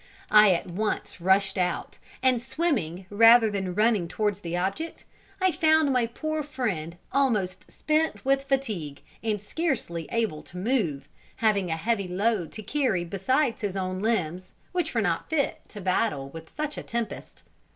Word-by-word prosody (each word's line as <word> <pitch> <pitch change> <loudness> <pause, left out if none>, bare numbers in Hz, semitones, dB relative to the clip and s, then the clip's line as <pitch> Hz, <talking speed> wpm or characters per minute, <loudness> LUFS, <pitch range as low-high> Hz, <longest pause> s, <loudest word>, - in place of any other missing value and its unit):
I 210 -2 +8
at 170 - -2
once 205 +1 -3
rushed 190 +1 +3
out, 180 0 -2 0.2
and 255 -3 +3
swimming 240 - -1
rather 225 +1 +7
than 190 -3 -3
running 210 -4 +3
towards 205 +2 -1
the 175 -3 -3
object, 195 - -3 0.3
I 375 -1 +3
found 315 -4 +3
my 245 -2 +2
poor 310 +6 -3
friend 215 - -3
almost 215 -10 0
spent 310 -2 0
with 275 0 +2
fatigue, 215 - -2 0.2
and 215 -2 -1
scarcely 210 - -2
able 220 -10 -1
to 180 - -12
move, 185 - 0 0.3
having 200 -5 +1
a 160 - -1
heavy 200 +2 0
load 195 -1 0
to 215 - -7
carry 235 -8 0
besides 230 - 0
his 200 -3 -2
own 185 -1 -2
old - - -5
limbs, 185 -5 -1 0.2
which 345 -6 -2
were 230 - +3
not 170 -4 -1
fit 310 -3 0
to 210 - -9
battle 185 -7 0
with 165 +2 -10
such 300 -1 -2
a - - -7
tempest. 235 -1 -5
210 Hz, 160 wpm, -27 LUFS, 180-260 Hz, 0.3 s, I